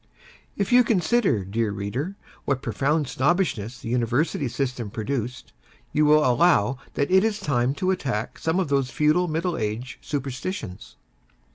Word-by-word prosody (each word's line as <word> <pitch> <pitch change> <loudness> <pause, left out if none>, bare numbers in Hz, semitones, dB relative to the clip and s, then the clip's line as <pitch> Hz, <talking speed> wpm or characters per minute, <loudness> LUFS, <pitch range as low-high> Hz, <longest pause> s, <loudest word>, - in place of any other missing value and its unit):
If 200 +1 -1
you 250 0 +7
consider, 185 - +2
dear 110 +3 -1
reader, 105 - -4 0.3
what 135 -2 -1
profound 140 +7 0
snobbishness 125 - 0
the 115 - -6
University 125 +5 0
System 125 -3 -3
produced, 120 +3 -4 0.4
you 150 +1 +3
will 150 0 +5
allow 125 -3 +3 0.2
that 140 +4 0
it 190 +1 +6
is 220 -1 0
time 130 -1 0
to 185 +5 0
attack 125 - -3
some 165 +3 0
of 185 - 0
those 135 -2 +1
feudal 155 +6 +2
middle 165 +2 -1
age 110 +5 -4
superstitions. 135 - -5
140 Hz, 145 wpm, -24 LUFS, 120-170 Hz, 0.4 s, you